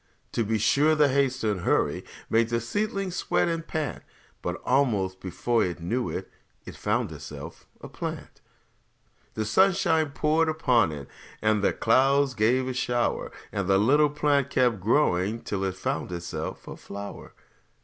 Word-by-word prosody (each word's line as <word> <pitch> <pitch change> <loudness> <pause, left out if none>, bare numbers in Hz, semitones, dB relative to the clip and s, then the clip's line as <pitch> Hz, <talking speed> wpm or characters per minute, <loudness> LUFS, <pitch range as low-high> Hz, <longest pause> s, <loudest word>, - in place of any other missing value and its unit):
To 115 - 0
be 110 +1 0
sure, 145 +9 +3
the 150 -2 +4
haste 130 -2 +1
and 105 -3 0
hurry - - +1 0.2
Made 115 0 +2
the 115 0 +1
seedling 195 - -2
sweat 175 - 0
and 165 -1 -2
pant; 155 -5 -3 0.4
But - - -3
almost 105 -9 +1
before 115 +6 0
it 90 -2 -3
knew 115 +9 -2
it - - -5 0.3
It - - -9
found - - -1
itself - - -9
a - - -8
plant. - - -7 0.9
The 110 - -1
sunshine 170 - +3
poured 155 +3 +1
upon 125 - +2
it, 70 -2 -7 0.3
And 110 -1 +2
the - - +4
clouds 135 +3 +3
they 110 -1 +2
gave 130 0 0
a 130 - -2
shower; 120 -1 -1 0.2
And 100 -2 -2
the 95 0 +4
little 145 +9 +4
plant 145 -2 +1
kept 125 -5 +2
growing 105 -1 +1
Till 100 -1 -3
it 95 -1 -2
found 95 - -3
itself 85 -1 -5
a - - -7
flower. 100 0 -9
125 Hz, 160 wpm, -26 LUFS, 105-150 Hz, 0.9 s, the